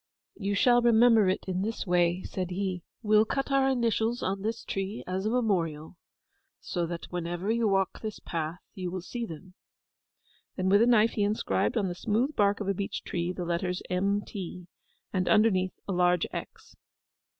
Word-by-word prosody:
'You 200 -1 -2
shall 240 +3 +5
remember 230 -3 +5
it 185 - -1
in 185 0 -1
this 220 +3 -3
way,' 175 0 +2
said 185 -2 -4
he. 185 -1 -2 0.2
'We'll 215 0 +5
cut 275 +5 -2
our 270 0 +3
initials 235 -2 0
on 195 +1 -1
this 225 +2 -3
tree 195 +3 -3
as 190 +3 -2
a - - +2
memorial, 180 -10 -1 0.6
so 175 -2 -2
that 170 0 -5
whenever 175 +3 -2
you 230 -1 +2
walk 195 -2 0
this 215 -2 -5
path 165 0 -4 0.2
you 185 -2 -4
will 185 0 -5
see 235 +4 -4
them.' 180 +2 -10 1.0
Then 185 -1 0
with 200 +2 +5
a 235 - +5
knife 230 -2 +5
he 210 - -2
inscribed 210 +3 0
on 200 -3 +1
the 175 - -3
smooth 230 +10 0
bark 205 -1 +2
of 205 - -4
a 195 - +2
beech 195 +1 -4
tree 175 0 -2
the 180 -1 -5
letters 180 +1 -2
M.T., 190 -1 -2 0.5
and 185 -2 0
underneath 190 -4 +3
a - - -2
large 180 -1 +3
X. - - -8
195 Hz, 180 wpm, -28 LUFS, 180-220 Hz, 1.0 s, shall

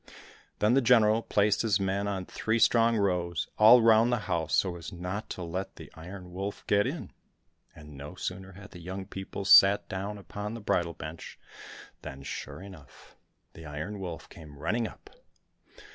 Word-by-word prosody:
Then 105 +3 +2
the 135 - +4
General 115 -2 +4
placed 105 -2 +1
his 110 -3 +1
men 100 +1 -1
in 95 -2 -3
three 110 +4 -1
strong 115 0 +4
rows 90 -6 0
all 115 +2 +8
round 115 +1 +5
the 120 -3 0
house 80 -2 -1
so 90 -3 +1
as 85 - -8
not 90 +4 -5
to 90 - -5
let 90 +3 -5
the - - -12
Iron 90 +2 -10
Wolf 95 +3 -5
get 100 0 +2
in; - - -5 0.6
and 75 -1 -13
no 75 +6 -9
sooner 95 +1 -6
had 100 +2 -13
the 90 - -11
young 95 +3 -6
people 95 0 -7
sat 100 +1 +7
down 100 +2 -4
upon 105 +2 -6
the - - -6
bridal 85 -5 0
bench, 80 +2 -9 0.6
than, 70 0 -9
sure 80 - -7
enough, 90 -9 -14 0.4
the 80 -1 -11
Iron 80 +8 -6
Wolf 90 -4 -6
came 75 -3 -13
running 115 +10 -1
up. - - -15
95 Hz, 175 wpm, -29 LUFS, 85-105 Hz, 0.6 s, all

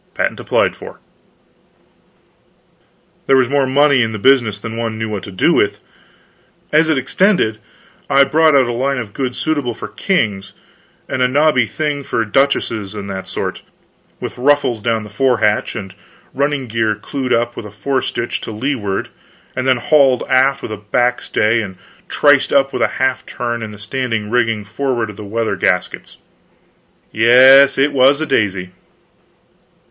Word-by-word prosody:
Patent - - -2
applied - - 0
for." - - -11 2.3
There 135 - +4
was 130 -2 +3
more 140 0 +1
money 140 0 +3
in 110 -1 -1
the - - -4
business 115 -2 +3
than 115 +2 -7
one 115 -1 -3
knew 110 0 -4
what 105 -3 -4
to 100 - -9
do 95 - +2
with. - - +1 0.9
As 155 +1 +3
it 155 - +2
extended, 135 - +1 0.5
I 140 0 +5
brought 155 +1 +3
out 135 -2 +5
a 120 - -3
line 135 +3 -1
of 110 -5 -6
goods 130 -2 -3
suitable 145 -7 -2
for - - -7
kings, 100 - -2 0.5
and 130 - -3
a 125 - +4
nobby 140 -3 +2
thing 150 0 -3
for 115 -4 -2
duchesses 110 -4 0
and 100 -1 -6
that 95 -1 -6
sort, - - -4 0.6
with - - -7
ruffles 135 -4 +1
down 115 0 -1
the 105 - -10
forehatch 110 -3 +1
and 100 -4 -6
the - - -20 0.4
running 140 0 -1
gear 110 -2 -1
clewed 130 +4 -5
up 120 +1 0
with 105 - -7
a - - -10
featherstitch 120 +3 -3
to - - -6
leeward 110 -4 -3 0.5
and 130 0 -2
then 130 -1 +3
hauled 135 0 +3
aft 135 +1 +2
with - - -6
a 110 - -4
back 120 +5 0
stay 115 +2 +1
and 95 -4 -8 0.3
triced 145 -2 +3
up 135 -1 +2
with - - -3
a - - +4
half 130 -1 0
turn 120 -1 -4
in 110 - -5
the 105 - -11
standing 115 -1 -3
rigging 115 -3 0
forward 115 +1 -3
of - - -15
the 105 - -9
weather 110 0 -2
gaskets. 90 -1 -2 0.9
Yes, 130 +5 +6
it 140 +2 +2
was 135 +2 +4
a 160 - -1
daisy. 95 -8 -1
120 Hz, 170 wpm, -17 LUFS, 110-135 Hz, 2.3 s, Yes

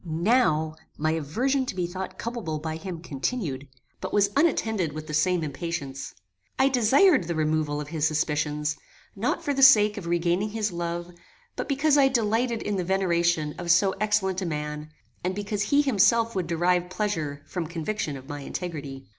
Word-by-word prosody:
Now 160 -3 +1 0.2
my 155 +1 +1
aversion 245 - 0
to - - -4
be 180 -2 -1
thought 185 +1 -6
culpable 225 -10 -4
by 160 +1 -4
him 175 -1 -6
continued, 140 - -3 0.3
but - - -5
was 200 -1 +3
unattended 220 - +1
with 155 0 -6
the 155 - -7
same 170 +3 +2
impatience. 140 -2 -5 0.4
I 270 - +4
desired 260 - +4
the 170 0 -3
removal 155 -1 0
of 150 0 -6
his 155 -1 +1
suspicions, 150 -1 -1 0.4
not - - -1
for 285 - 0
the 275 - -1
sake 215 -5 +7
of 185 -4 -6
regaining 175 +4 +1
his 215 -1 -2
love, 170 0 -4 0.4
but - - -4
because 285 +1 +3
I 270 - +6
delighted 235 -1 0
in 205 -1 -1
the 185 - -1
veneration 170 -4 +1
of 175 -1 -5
so 190 +3 +5
excellent 205 -3 +1
a - - -2
man, 150 -1 -4 0.3
and 185 +1 -1
because 205 0 -3
he 285 +8 +3
himself 230 -2 +3
would 185 -3 -1
derive 175 +1 +1
pleasure 165 -8 -2
from 165 +1 -4
conviction 165 -2 -3
of 130 0 -13
my 145 -1 -6
integrity. 140 -4 -6
175 Hz, 175 wpm, -26 LUFS, 155-210 Hz, 0.4 s, sake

